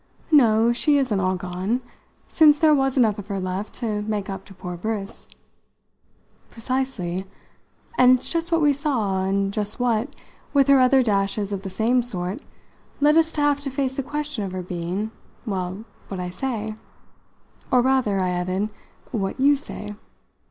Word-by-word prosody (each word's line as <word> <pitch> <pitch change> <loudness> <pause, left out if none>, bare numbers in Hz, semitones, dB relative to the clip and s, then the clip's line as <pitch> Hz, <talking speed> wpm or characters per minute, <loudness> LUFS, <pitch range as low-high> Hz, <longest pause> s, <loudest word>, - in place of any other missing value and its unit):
"No, 235 -5 +5
she 290 +4 +3
isn't 250 -8 +1
all 185 0 +1
gone, 185 +7 -2 0.5
since 300 -2 +5
there 310 0 +5
was 270 -1 +1
enough 220 -4 +3
of 205 - -8
her 200 -2 -3
left 185 +3 -4
to 215 -4 -2
make 210 -2 -3
up 190 0 -7
to 195 - -13
poor 180 -1 -6
Briss." 205 +2 -4 1.2
"Precisely 225 -7 -2 0.7
and 255 0 +7
it's - - -2
just 335 +1 +1
what 330 -1 +3
we 290 -1 +5
saw, 240 -10 0
and 195 +1 0
just 210 +2 -3
what, 245 +3 0 0.4
with 275 -1 +5
her 275 -1 +7
other 255 +1 +5
dashes 200 -1 0
of 195 - -3
the 195 - -6
same 235 +6 +2
sort, 195 0 -4 0.6
led 295 +1 +4
us 325 0 +4
to 300 - -1
have 290 -1 +3
to 285 -1 -4
face 265 -1 -2
the 275 - -1
question 290 -3 -4
of 190 -2 -5
her 185 -1 -4
being 180 +5 -3 0.3
well, 190 0 -4 0.2
what 195 - -5
I 180 0 -4
say. 220 +1 -3 1.0
Or 250 -1 +4
rather," 255 -7 +2
I 185 -1 +1
added, 185 +4 -1 0.4
"what 200 0 -2
you 285 +2 +5
say. 270 -7 -6
220 Hz, 170 wpm, -23 LUFS, 195-270 Hz, 1.2 s, and